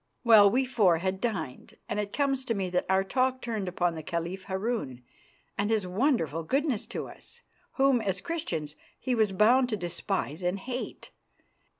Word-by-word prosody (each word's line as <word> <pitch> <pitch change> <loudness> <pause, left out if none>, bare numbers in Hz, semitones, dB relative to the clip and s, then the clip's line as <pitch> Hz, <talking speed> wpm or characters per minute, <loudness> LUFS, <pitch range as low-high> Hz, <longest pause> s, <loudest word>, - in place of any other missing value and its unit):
Well, 220 -4 +8
we 260 +5 +2
four 210 -9 +3
had 190 +3 -2
dined, 195 - -4
and 210 - -2
it 205 -1 -3
comes 275 -2 0
to 230 - 0
me 190 -2 -2
that 180 - 0
our 190 0 +3
talk 255 +5 +1
turned 220 -6 -3
upon 175 -1 0
the 160 - -6
Caliph 170 +3 -4
Harun 190 - -3 0.6
and 205 +1 +1
his 220 -4 +1
wonderful 180 - +1
goodness 270 - 0
to - - -5
us, - - -12 0.3
whom 270 -3 +3
as 195 -3 -1
Christians 165 - -4 0.2
he 255 - -1
was 220 -4 +2
bound 240 +6 +4
to 215 - -1
despise 175 -2 -3
and 180 +2 0
hate. 250 +5 -6
205 Hz, 175 wpm, -28 LUFS, 180-245 Hz, 0.6 s, Well